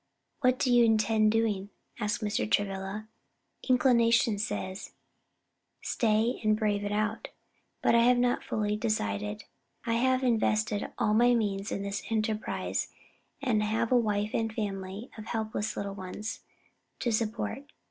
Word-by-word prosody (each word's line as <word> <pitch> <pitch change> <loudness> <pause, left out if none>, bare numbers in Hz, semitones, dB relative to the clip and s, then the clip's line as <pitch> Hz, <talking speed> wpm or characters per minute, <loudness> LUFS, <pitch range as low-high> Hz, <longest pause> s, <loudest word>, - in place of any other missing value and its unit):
"What 255 -2 +3
do 250 -1 +2
you 240 0 +6
intend 220 -1 +3
doing?" 210 -3 0 0.3
asked 210 0 -1
Mr. 200 - -1
Travilla. 195 - -1 0.6
"Inclination 235 -4 +4
says, 205 -2 -4 0.9
'Stay 225 +1 +1
and 215 0 +3
brave 205 -2 0
it 205 - -2
out;' 215 +1 -1 0.6
but - - +4
I 235 - +6
have 250 0 +5
not 245 0 +2
yet - - -17
fully 210 -1 -1
decided. 105 - -2 0.4
I 230 - 0
have 260 +2 +2
invested 215 -3 +1
all 210 - +2
my 240 +2 +5
means 205 -3 -1
in 200 - -2
this 200 0 -3
enterprise, 215 -1 -1 0.5
and 230 -5 +2
have 225 +2 0
a - - +5
wife 210 -3 +1
and 225 -1 0
family 200 0 -5
of 215 - -7
helpless 220 -2 -3
little 200 0 -3
ones 200 +3 -6 0.6
to 240 - -1
support." 230 +5 -2
215 Hz, 145 wpm, -29 LUFS, 205-230 Hz, 0.9 s, you